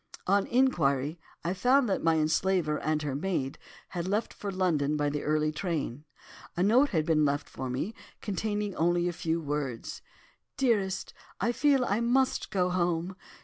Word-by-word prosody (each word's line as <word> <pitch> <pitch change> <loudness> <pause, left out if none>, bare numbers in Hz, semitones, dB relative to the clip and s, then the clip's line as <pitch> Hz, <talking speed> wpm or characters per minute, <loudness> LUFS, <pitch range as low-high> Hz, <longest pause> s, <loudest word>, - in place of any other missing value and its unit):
"On 200 +1 +2
inquiry, 160 - +2 0.2
I 175 - 0
found 250 +7 +3
that 195 - 0
my 165 0 +3
enslaver 160 0 +1
and 155 0 -1
her 145 -2 -2
maid 140 -3 -2 0.3
had 175 -1 -4
left 210 +4 -1
for 205 - -5
London 160 -6 +1
by 145 -1 0
the 145 0 -2
early 155 0 +1
train. 155 -5 -3 0.5
A 175 - +2
note 250 +8 +5
had 160 -8 0
been 155 -2 +3
left 145 0 0
for 130 - -6
me, 135 - -2 0.3
containing 205 0 -2
only 175 +1 +2
a 175 - -1
few 165 -1 -1
words. 145 -6 -4 0.6
'Dearest, 205 -8 0 0.3
I 235 - +1
feel 275 0 +3
I 205 0 +1
must 250 +3 +1
go 180 -2 +1
home. 175 0 0
175 Hz, 165 wpm, -29 LUFS, 150-205 Hz, 0.6 s, note